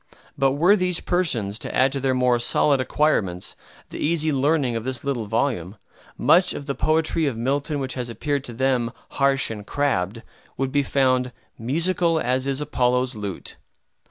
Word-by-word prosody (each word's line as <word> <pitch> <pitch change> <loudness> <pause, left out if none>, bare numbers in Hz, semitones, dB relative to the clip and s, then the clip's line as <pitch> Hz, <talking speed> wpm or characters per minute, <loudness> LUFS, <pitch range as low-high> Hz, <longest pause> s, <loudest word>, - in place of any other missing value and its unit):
But 135 -1 +2
were 175 +8 +4
these 180 -3 0
persons 120 - 0
to - - -6
add 130 +1 +4
to 135 - -3
their 130 -1 0
more 125 -1 +2
solid 135 +3 +3
acquirements 110 - 0 0.3
the - - -8
easy 155 0 +1
learning 140 -2 +1
of 115 - -3
this 130 0 -4
little 135 -5 -2
volume, 110 -4 -1 0.4
much 180 +2 +4
of 140 - -6
the 140 - -2
poetry 155 +1 +1
of 125 -5 -2
Milton 140 +5 -1
which 130 -2 -3
has 125 -2 -4
appeared 140 +3 -2
to 120 - -7
them 125 -1 0 0.2
"harsh 135 -3 +1
and 105 -2 -6
crabbed" 115 -5 -1 0.3
would 135 0 -1
be 145 +1 +2
found 130 -2 +1 0.3
"musical 165 +6 +1
as 130 0 0
is 135 +1 -1
Apollo's 125 -2 0
lute." 100 -3 -6
135 Hz, 170 wpm, -23 LUFS, 120-145 Hz, 0.4 s, were